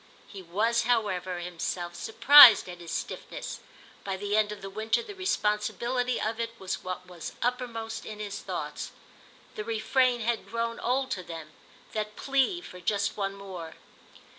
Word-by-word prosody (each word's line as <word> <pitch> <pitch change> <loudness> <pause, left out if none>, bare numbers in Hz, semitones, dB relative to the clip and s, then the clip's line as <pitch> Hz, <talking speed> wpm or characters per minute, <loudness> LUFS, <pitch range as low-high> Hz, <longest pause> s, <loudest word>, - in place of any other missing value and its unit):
He 195 - -9
was, 220 +7 +1
however, 190 -7 0
himself 175 0 -4
surprised 235 +3 +8
at 175 -1 -8
his 170 -1 -10
stiffness; - - -5 0.4
by 195 -1 -3
the 205 +1 -1
end 215 -1 +3
of 210 -1 -8
the - - -4
winter 220 - 0
the 425 -3 -9
responsibility 245 - 0
of 220 +1 -2
it 230 0 -3
was 190 -1 -4
what 185 0 -5
was 180 -2 -8
uppermost 235 -3 -2
in 215 - -7
his 205 -1 -5
thoughts. - - -5 0.6
The 215 - -5
refrain 235 +3 +1
had 230 +1 -1
grown 230 0 -2
old 260 +2 0
to 185 - -2
them, 165 -3 -8 0.4
that 210 -1 -3
plea 275 +6 +1
for 180 - -11
just 205 +1 0
one 195 -1 -2
more. 185 -5 -8
215 Hz, 160 wpm, -28 LUFS, 190-235 Hz, 0.6 s, surprised